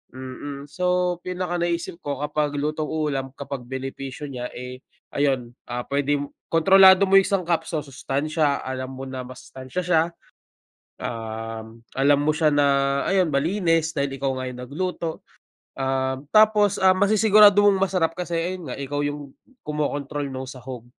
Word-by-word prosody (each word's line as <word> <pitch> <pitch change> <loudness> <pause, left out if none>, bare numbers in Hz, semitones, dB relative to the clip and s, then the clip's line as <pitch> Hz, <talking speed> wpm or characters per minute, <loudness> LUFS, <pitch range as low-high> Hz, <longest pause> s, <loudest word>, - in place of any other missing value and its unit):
mm, 140 +2 -7
so 180 -1 +1
pinaka 180 -1 -2
naisip 170 0 -2
ko 140 -1 -4
kapag 150 0 -1
lutong 150 +1 -2
ulam, 140 -4 -2
kapag 140 -3 -6
benepisyo 135 +2 -6
niya, 125 -1 -4
eh, 125 +1 -7 0.3
ayun, 135 -4 0 0.2
ah, 120 0 -3
puwede 145 +1 +1 0.4
kontrolado 190 +3 +7
mo 195 - +4
yung 195 - 0
sangkap, 175 -4 +1
sa 155 - -1
sustansiya 145 +2 -1
alam 130 0 -4
mo 135 - -7
na 130 -1 -5
masustansiya 130 +4 -7
siya, 165 -2 +3 1.0
um, 115 0 -6 0.2
alam 140 +1 +4
mo 150 - +1
siya 155 0 +3
na 145 -1 +4 0.4
ayon, 185 -4 +3
malinis 165 +1 +1
dahil 140 -1 -1
ikaw 135 -1 0
nga 130 - -3
yung 125 0 -8
nagluto, 165 +4 -4 0.5
um, 130 0 -1
tapos, 215 -2 +5
ah, 190 0 +6
masisigurado 205 0 +6
mong 200 -1 +5
masarap 165 -4 +1
kasi 180 -1 -5
ayun 175 +1 -3
nga - - -5
ikaw 145 +1 -3
yung 145 -1 -5 0.3
kumokontrol 145 -1 -2
nong 130 0 -6
sahog 130 -2 -9
145 Hz, 150 wpm, -24 LUFS, 130-175 Hz, 1.0 s, kontrolado